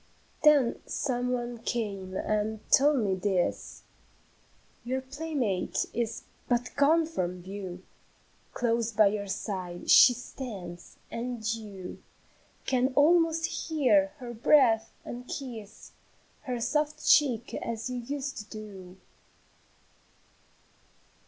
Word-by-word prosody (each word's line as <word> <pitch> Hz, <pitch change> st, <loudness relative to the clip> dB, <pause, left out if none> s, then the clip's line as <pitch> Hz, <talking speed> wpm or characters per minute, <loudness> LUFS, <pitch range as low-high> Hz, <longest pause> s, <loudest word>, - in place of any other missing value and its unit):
Then 290 Hz, -6 st, +5 dB
some 250 Hz, -2 st, -1 dB
one 240 Hz, -1 st, -3 dB
came 200 Hz, -5 st, -3 dB
and 215 Hz, 0 st, -2 dB
told 280 Hz, -1 st, +5 dB
me 200 Hz, -3 st, +1 dB
this: 185 Hz, -1 st, -1 dB, 1.0 s
"Your 255 Hz, +2 st, -1 dB
playmate 265 Hz, -, -2 dB
is 230 Hz, 0 st, -2 dB, 0.3 s
but 245 Hz, 0 st, +1 dB
gone 315 Hz, +4 st, +4 dB
from 180 Hz, -, -3 dB
view, 185 Hz, -1 st, -7 dB, 0.7 s
Close 235 Hz, -1 st, 0 dB
by 215 Hz, -1 st, +5 dB
your 200 Hz, 0 st, -3 dB
side 185 Hz, -3 st, -3 dB
she 245 Hz, -, +9 dB
stands, 200 Hz, -9 st, -8 dB
and 235 Hz, -2 st, -4 dB
you 205 Hz, -5 st, -8 dB, 0.6 s
Can 255 Hz, 0 st, +2 dB
almost 330 Hz, +2 st, +4 dB
hear 295 Hz, -2 st, +2 dB
her 245 Hz, -3 st, -7 dB
breathe, 235 Hz, -1 st, +5 dB, 0.2 s
and 245 Hz, +1 st, -7 dB
kiss 225 Hz, -6 st, -8 dB, 0.5 s
Her 250 Hz, -2 st, -2 dB
soft 300 Hz, +5 st, -1 dB
cheek 255 Hz, -7 st, +4 dB
as 230 Hz, +1 st, -4 dB
you 250 Hz, -, -3 dB
used 270 Hz, +3 st, -4 dB
to 210 Hz, -, -6 dB
do. 195 Hz, -4 st, -10 dB
235 Hz, 105 wpm, -29 LUFS, 205-270 Hz, 1.0 s, she